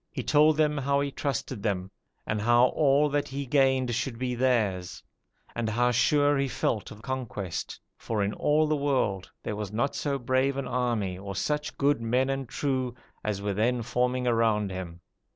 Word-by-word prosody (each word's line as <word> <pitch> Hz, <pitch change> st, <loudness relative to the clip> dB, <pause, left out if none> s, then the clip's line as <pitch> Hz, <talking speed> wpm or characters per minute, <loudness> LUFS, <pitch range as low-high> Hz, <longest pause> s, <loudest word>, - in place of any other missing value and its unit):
He -, -, -4 dB
told 155 Hz, 0 st, +4 dB
them 150 Hz, -1 st, +2 dB
how 140 Hz, +1 st, +1 dB
he 140 Hz, 0 st, -2 dB
trusted 130 Hz, -5 st, -3 dB
them, 95 Hz, -3 st, -2 dB, 0.3 s
and 105 Hz, -1 st, -1 dB
how 120 Hz, +3 st, +5 dB
all 145 Hz, 0 st, +3 dB
that 145 Hz, 0 st, 0 dB
he 140 Hz, +1 st, -4 dB
gained 130 Hz, -2 st, +2 dB
should 120 Hz, 0 st, -2 dB
be 125 Hz, 0 st, -2 dB
theirs; 110 Hz, -8 st, 0 dB, 0.5 s
and 115 Hz, -2 st, -1 dB
how 120 Hz, +3 st, +2 dB
sure 145 Hz, +4 st, +3 dB
he 140 Hz, -, +1 dB
felt 115 Hz, -4 st, -1 dB
of 110 Hz, 0 st, -12 dB
conquest, 115 Hz, -8 st, -4 dB, 0.2 s
for 110 Hz, -3 st, -2 dB
in 100 Hz, +1 st, -1 dB
all 150 Hz, +1 st, +2 dB
the 155 Hz, 0 st, +1 dB
world 130 Hz, -10 st, 0 dB
there 105 Hz, -, -3 dB
was 105 Hz, -2 st, -5 dB
not 120 Hz, +6 st, 0 dB
so 140 Hz, -2 st, -1 dB
brave 130 Hz, +2 st, +1 dB
an 135 Hz, -2 st, -3 dB
army 120 Hz, -7 st, -1 dB
or 100 Hz, 0 st, -6 dB
such 150 Hz, +9 st, -2 dB
good 140 Hz, -2 st, +2 dB
men 125 Hz, +4 st, +1 dB
and 135 Hz, -2 st, -4 dB
true 130 Hz, -4 st, -1 dB, 0.3 s
as 100 Hz, -2 st, -2 dB
were 100 Hz, -1 st, -1 dB
then 120 Hz, +4 st, +1 dB
forming 125 Hz, +2 st, 0 dB
around 110 Hz, -4 st, +2 dB
him. 90 Hz, -2 st, -7 dB
125 Hz, 185 wpm, -27 LUFS, 105-140 Hz, 0.5 s, how